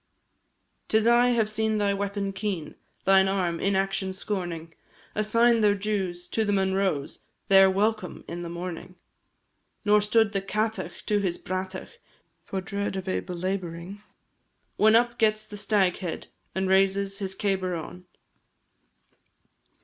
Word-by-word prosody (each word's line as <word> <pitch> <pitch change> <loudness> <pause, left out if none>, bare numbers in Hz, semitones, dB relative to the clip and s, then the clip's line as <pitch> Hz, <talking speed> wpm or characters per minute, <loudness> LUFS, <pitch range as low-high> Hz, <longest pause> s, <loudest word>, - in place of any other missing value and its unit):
'Tis 220 0 +2
I 240 +1 +5
have 235 -3 +2
seen 220 0 0
thy 205 -1 +1
weapon 200 0 -2
keen, 190 -6 -3 0.3
Thine 190 0 +5
arm, 180 -4 0
inaction 195 -1 0
scorning, 175 -4 -4 0.4
Assign 230 +2 +3
their 205 -1 +4
dues 195 -4 -2
to 225 - 0
the 205 - 0
Munroes, 190 -6 0 0.3
Their 195 0 +7
welcome 205 -1 -1
in 175 +1 -5
the 170 - -5
morning. 175 +1 -6 0.9
Nor 210 0 +5
stood 215 0 +3
the 195 -1 -1
Cátach 210 -2 -3
to 210 -1 +2
his 185 -4 -1
bratach 185 - -5 0.4
For 190 - -4
dread 200 +1 -3
of 190 -1 -5
a 185 - 0
belabouring, 180 +1 -4 0.7
When 220 +1 +5
up 240 +1 +2
gets 215 -1 +2
the 215 -1 -10
Staghead, 195 -4 0 0.3
And 190 0 0
raises 195 +1 +2
his 190 -1 -4
cabar 190 -3 -1
on. 180 +2 -8
195 Hz, 135 wpm, -26 LUFS, 185-210 Hz, 0.9 s, Their